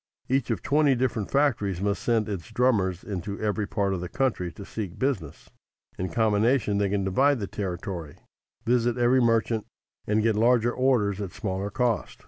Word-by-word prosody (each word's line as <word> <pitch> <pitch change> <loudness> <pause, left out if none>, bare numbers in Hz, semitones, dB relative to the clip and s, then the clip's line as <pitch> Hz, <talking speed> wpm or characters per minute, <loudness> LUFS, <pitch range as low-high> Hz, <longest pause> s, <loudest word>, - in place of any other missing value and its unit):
Each 135 -1 0
of - - -2
twenty 145 -2 +3
different 120 -5 -1
factories 115 -10 +1
must 100 +1 -1
send 115 -2 +1
its 95 -6 -5
drummers 100 -8 +1
into 100 0 -5
every 105 -1 -1
part 100 -3 0
of 90 - -3
the 90 - -5
country 120 -10 -1
to 100 - -10
seek 100 -5 -6
business. 120 - -3 0.5
In 95 0 -2
combination 110 -1 +2
they 100 -1 +1
can 100 0 0
divide 130 +9 +2
the 100 - -2
territory, 90 -5 -5 0.5
visit 120 0 +2
every 125 +2 +4
merchant 115 -1 +1 0.4
and 105 +1 +2
get 115 -1 +2
larger 120 +1 +3
orders 110 -7 +1
at 95 -3 -5
smaller 95 -2 -3
cost. 120 +1 -1
105 Hz, 170 wpm, -26 LUFS, 100-120 Hz, 0.5 s, every